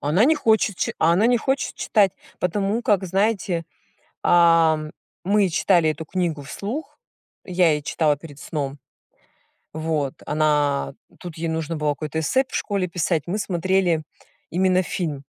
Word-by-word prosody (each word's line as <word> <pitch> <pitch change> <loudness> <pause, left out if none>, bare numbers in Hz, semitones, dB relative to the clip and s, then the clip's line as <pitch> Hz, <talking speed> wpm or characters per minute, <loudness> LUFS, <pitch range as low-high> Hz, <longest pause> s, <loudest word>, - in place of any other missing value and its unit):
Она 160 +10 +3
не 315 +3 +4
хочет 220 -7 +2
чи - - -1
а 165 +1 +4
она 200 +6 +3
не 245 0 +4
хочет 265 +3 -1
читать, 200 -4 +2 0.3
потому 200 +5 0
как, 200 -4 +2
знаете, 190 -2 0 0.6
ам, 165 -3 +4 0.3
мы 200 0 +3
читали 170 -1 +3
эту 160 +1 -5
книгу 165 -4 -2
вслух, 220 - -6 0.5
я 180 -3 +3
ей 150 - -1
читала 150 -1 +1
перед 145 -2 -12
сном, 140 -2 -4 1.0
вот, 155 -3 -2
она 150 -2 +1 0.3
тут 175 -3 -9
ей 165 +1 -3
нужно 160 0 -3
было 150 -1 0
какое-то 155 +2 -4
эссе 260 - +2
в - - -17
школе 200 -3 -1
писать, 170 -3 -1
мы 195 +4 -1
смотрели 185 -3 +1 0.5
именно 185 +1 +2
фильм, 150 -6 -4
170 Hz, 150 wpm, -23 LUFS, 155-195 Hz, 1.0 s, не